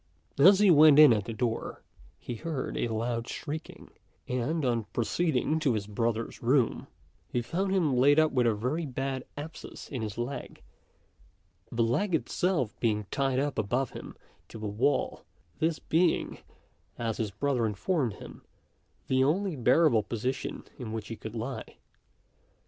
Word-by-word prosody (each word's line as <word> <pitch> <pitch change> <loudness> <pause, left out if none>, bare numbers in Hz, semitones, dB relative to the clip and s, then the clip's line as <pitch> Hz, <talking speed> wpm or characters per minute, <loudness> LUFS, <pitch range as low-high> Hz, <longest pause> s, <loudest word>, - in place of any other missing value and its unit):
As 190 +7 +8
he 205 -3 +6
went 155 -2 +7
in 150 -5 +9
at 105 -3 -1
the - - -5
door, 115 0 -3 0.3
he 120 - -6
heard 145 +3 -4
a - - 0
loud 115 +1 -2
shrieking; 155 +2 -7 0.4
and, 130 +5 -1
on 120 -3 0
proceeding 155 +6 0
to 135 -7 +1
his 105 -2 -2
brother's 115 +2 -2
room, 125 0 +1 0.4
he 120 - -1
found 190 +9 -1
him 165 -9 +2
laid 140 +4 +5
up 155 -1 +4
with 125 -2 +2
a 110 - +2
very 140 +9 -2
bad 135 0 -3
abscess 155 +3 -8
in 130 -5 -4
his 105 -2 -5
leg, 120 +4 -5 1.1
the 115 - +1
leg 170 - +1
itself 160 - 0
being 105 -3 0
tied 135 -2 0
up 140 -2 -1
above 120 +5 0
him - - -9 0.3
to - - -10
the 110 - -6
wall, 110 +8 0 0.4
this 160 0 +1
being, 170 +1 +1 0.6
as 115 -2 -2
his 110 -2 -1
brother 120 +3 0
informed 120 - -1
him, - - -11 0.6
the 130 0 +2
only 180 +5 +1
bearable 130 -1 +4
position 120 +5 -4 0.2
in 115 -4 -5
which 110 -2 -5
he 115 - -4
could 110 +1 -8
lie. 120 +4 -6
125 Hz, 155 wpm, -29 LUFS, 115-155 Hz, 1.1 s, in